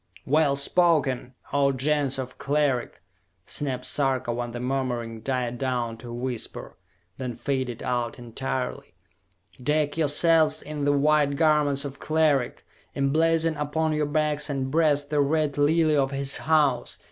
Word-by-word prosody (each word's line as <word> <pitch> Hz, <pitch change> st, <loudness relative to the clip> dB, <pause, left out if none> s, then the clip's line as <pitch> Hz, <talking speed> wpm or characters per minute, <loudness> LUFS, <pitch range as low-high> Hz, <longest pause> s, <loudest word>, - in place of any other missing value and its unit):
"Well 150 Hz, 0 st, +3 dB
spoken, 140 Hz, -5 st, +1 dB, 0.2 s
O 140 Hz, -1 st, +3 dB
Gens 140 Hz, 0 st, 0 dB
of 130 Hz, -1 st, -6 dB
Cleric!" 140 Hz, -, 0 dB, 0.4 s
snapped 130 Hz, -3 st, -2 dB
Sarka 130 Hz, -2 st, -1 dB
when 120 Hz, 0 st, -4 dB
the 120 Hz, -, -6 dB
murmuring 125 Hz, -3 st, -2 dB
died 125 Hz, -1 st, -2 dB
down 125 Hz, -3 st, -1 dB
to 115 Hz, -, -11 dB
a -, -, -6 dB
whisper, 120 Hz, -1 st, -5 dB, 0.4 s
then 125 Hz, -3 st, -4 dB
faded 130 Hz, -4 st, -3 dB
out 120 Hz, -2 st, -2 dB
entirely. 130 Hz, +3 st, -4 dB, 0.7 s
"Deck 150 Hz, +2 st, 0 dB
yourselves 160 Hz, +1 st, +2 dB
in 150 Hz, -1 st, -4 dB
the 145 Hz, -, +4 dB
white 145 Hz, 0 st, +3 dB
garments 150 Hz, -2 st, +2 dB
of 140 Hz, 0 st, -7 dB
Cleric! 155 Hz, -5 st, +1 dB, 0.3 s
Emblazon 160 Hz, +3 st, +2 dB
upon 155 Hz, +2 st, -1 dB
your 150 Hz, -1 st, 0 dB
backs 150 Hz, 0 st, 0 dB
and 135 Hz, -2 st, -2 dB
breast 145 Hz, -2 st, +2 dB
the 150 Hz, -1 st, +3 dB
Red 150 Hz, 0 st, +1 dB
Lily 155 Hz, +1 st, +3 dB
of 135 Hz, -2 st, +2 dB
his 140 Hz, 0 st, +1 dB
House! 145 Hz, -6 st, +1 dB
140 Hz, 140 wpm, -25 LUFS, 130-150 Hz, 0.7 s, the